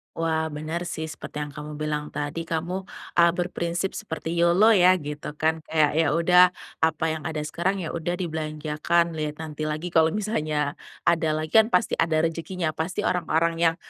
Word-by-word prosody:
Wah, 160 Hz, -1 st, 0 dB
bener, 160 Hz, +3 st, -4 dB
sih, 160 Hz, -, -4 dB
seperti 150 Hz, 0 st, -6 dB
yang 145 Hz, -, -7 dB
kamu 150 Hz, +1 st, -8 dB
bilang 150 Hz, 0 st, -2 dB
tadi 150 Hz, +3 st, -4 dB
kamu, 175 Hz, +4 st, -3 dB, 0.3 s
eee, 170 Hz, 0 st, +7 dB
berprinsip 175 Hz, +1 st, -2 dB
seperti 165 Hz, -5 st, -5 dB
YOLO 170 Hz, +6 st, +5 dB
ya 185 Hz, -3 st, +6 dB
gitu, 150 Hz, -2 st, -6 dB
kan, 160 Hz, +1 st, +1 dB
kayak, 155 Hz, -2 st, +3 dB
ya 160 Hz, +1 st, +2 dB
udah 180 Hz, +2 st, +5 dB, 0.2 s
apa 160 Hz, 0 st, +1 dB
yang 155 Hz, -2 st, -4 dB
ada 155 Hz, -1 st, -3 dB
sekarang, 180 Hz, +5 st, -1 dB
ya, 160 Hz, -, -4 dB
udah 170 Hz, +1 st, -2 dB
dibelanjakan 160 Hz, 0 st, -1 dB
liat 155 Hz, -2 st, -3 dB
nanti 155 Hz, -1 st, -4 dB
lagi 155 Hz, +3 st, -3 dB
kalau 160 Hz, +1 st, +3 dB
misalnya 155 Hz, -9 st, -1 dB, 0.2 s
ada 160 Hz, -2 st, +2 dB
lagi, 155 Hz, 0 st, -3 dB
kan, 220 Hz, -, +4 dB
pasti 230 Hz, -1 st, +1 dB
ada 160 Hz, -1 st, +2 dB
rejekinya, 165 Hz, +1 st, -2 dB
pasti 160 Hz, +3 st, -3 dB
orang-orang 165 Hz, -1 st, +1 dB
yang 165 Hz, -1 st, +3 dB
160 Hz, 175 wpm, -25 LUFS, 155-170 Hz, 0.3 s, eee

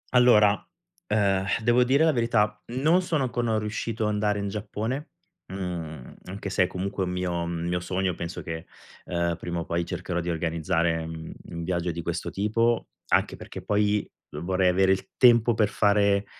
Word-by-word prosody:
Allora, 105 Hz, -4 st, +5 dB, 0.4 s
ehm, 100 Hz, -3 st, +2 dB, 0.2 s
devo 120 Hz, +2 st, +4 dB
dire 135 Hz, +5 st, +3 dB
la 160 Hz, -, +5 dB
verità, 115 Hz, -4 st, +1 dB
non 150 Hz, +9 st, +2 dB
sono 165 Hz, -6 st, 0 dB
ancora 120 Hz, -3 st, 0 dB
riuscito 110 Hz, +1 st, -3 dB
ad 105 Hz, -, +1 dB
andare 105 Hz, 0 st, +1 dB
in 100 Hz, 0 st, -2 dB
Giappone, 110 Hz, +8 st, -4 dB, 0.4 s
mhmm, 85 Hz, -8 st, -5 dB
anche 100 Hz, +1 st, -6 dB
se 95 Hz, -, +3 dB
è -, -, +1 dB
comunque 95 Hz, +2 st, -3 dB
un 90 Hz, -, -3 dB
mio 90 Hz, -2 st, -2 dB
mio 85 Hz, +1 st, -2 dB
sogno. 90 Hz, +1 st, -1 dB
Penso 85 Hz, +1 st, -6 dB
che, 80 Hz, -1 st, -6 dB, 0.4 s
ehm, 85 Hz, -1 st, -1 dB
prima 85 Hz, 0 st, -3 dB
o -, -, -6 dB
poi 85 Hz, 0 st, -1 dB
cercherò 85 Hz, 0 st, -3 dB
di 85 Hz, -, -3 dB
organizzare, 80 Hz, 0 st, 0 dB
mhmm, 80 Hz, 0 st, -7 dB, 0.2 s
un 85 Hz, 0 st, -5 dB
viaggio 85 Hz, 0 st, -1 dB
di 85 Hz, 0 st, -4 dB
questo 85 Hz, 0 st, -3 dB
tipo, 115 Hz, +3 st, +1 dB, 0.2 s
anche -, -, +2 dB
perché -, -, -9 dB
poi 105 Hz, 0 st, +1 dB, 0.2 s
vorrei 95 Hz, +1 st, +1 dB
avere 95 Hz, +1 st, +3 dB
il 95 Hz, -, -1 dB
tempo 120 Hz, -2 st, +6 dB
per 110 Hz, -2 st, +2 dB
fare, 100 Hz, -1 st, +3 dB
95 Hz, 170 wpm, -26 LUFS, 85-110 Hz, 0.4 s, tempo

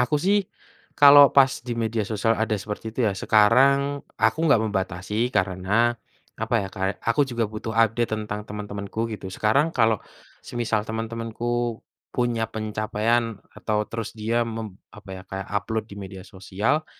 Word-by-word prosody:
aku 125 Hz, +5 st, +2 dB
sih 195 Hz, +4 st, +1 dB, 0.5 s
kalau 145 Hz, -1 st, +9 dB
pas 135 Hz, -1 st, +7 dB
di 120 Hz, -1 st, -5 dB
media 115 Hz, -1 st, -1 dB
sosial 115 Hz, +1 st, +1 dB
ada 110 Hz, -1 st, 0 dB
seperti 105 Hz, +2 st, -6 dB
itu 125 Hz, -, +1 dB
ya 105 Hz, -, +2 dB
sekarang 130 Hz, +8 st, +3 dB, 0.2 s
aku -, -, +2 dB
nggak 115 Hz, -7 st, +4 dB
membatasi 100 Hz, +2 st, -2 dB
karena, 95 Hz, +4 st, +2 dB, 0.5 s
apa 115 Hz, +2 st, -2 dB
ya 95 Hz, -, -5 dB
Kak 95 Hz, +1 st, -2 dB
aku 125 Hz, +5 st, +2 dB
juga 120 Hz, -2 st, -1 dB
butuh 110 Hz, +1 st, -5 dB
update 115 Hz, +1 st, +2 dB
tentang 105 Hz, -1 st, -4 dB
teman-temanku 105 Hz, +1 st, -4 dB
gitu 95 Hz, -2 st, -6 dB
sekarang 110 Hz, -, +2 dB
kalau 110 Hz, -3 st, +3 dB, 0.4 s
semisal 115 Hz, -3 st, -1 dB
teman-temanku 115 Hz, +1 st, -3 dB, 0.3 s
punya 120 Hz, -2 st, 0 dB
pencapaian 110 Hz, +1 st, -1 dB, 0.2 s
atau 105 Hz, -1 st, -1 dB
terus 115 Hz, -2 st, -5 dB
dia 115 Hz, +2 st, 0 dB
mem 110 Hz, -4 st, -6 dB, 0.2 s
apa 105 Hz, -2 st, -12 dB
ya -, -, -10 dB
kayak 95 Hz, 0 st, -6 dB
upload 110 Hz, +2 st, -2 dB
di 100 Hz, -, -9 dB
media 95 Hz, -1 st, -8 dB
sosial, 105 Hz, +9 st, -2 dB
110 Hz, 150 wpm, -24 LUFS, 105-120 Hz, 0.5 s, kalau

